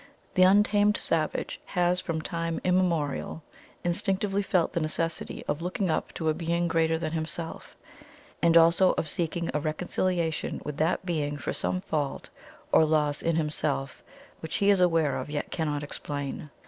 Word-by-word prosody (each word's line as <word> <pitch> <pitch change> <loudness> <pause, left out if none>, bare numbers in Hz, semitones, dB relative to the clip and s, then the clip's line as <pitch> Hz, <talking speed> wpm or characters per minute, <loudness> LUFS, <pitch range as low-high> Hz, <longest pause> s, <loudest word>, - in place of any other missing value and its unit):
The 185 - +2
untamed 205 +2 +5
savage 155 -2 -1
has 180 0 +1
from 160 -1 -3
time 165 -2 -2
immemorial 170 -4 0 0.4
instinctively 195 +3 0
felt 180 -4 +1
the 170 - 0
necessity 165 +1 -2
of 150 - -1
looking 180 +1 -1
up - - -1
to 160 - -3
a 155 - +3
Being 170 +1 -1
greater 160 0 +2
than 160 -1 -3
Himself, 165 +1 -4 0.7
and 170 0 +5
also 170 +3 +5
of 155 - -2
seeking 170 +1 -1
a 150 - +1
reconciliation 165 +1 -1
with 150 -1 -5
that 160 +4 0
Being 150 -4 -1
for - - -3
some 185 - -1
fault 150 -6 -3 0.4
or - - +6
loss 150 -2 +1
in 165 -1 +1
himself 150 -3 -1 0.4
which 160 - -5
he 200 0 +4
is 195 -2 +3
aware 165 -5 +3
of, 130 - -5
yet 145 0 -4
cannot 150 -3 -2
explain. 145 0 -5
165 Hz, 160 wpm, -27 LUFS, 155-180 Hz, 0.7 s, or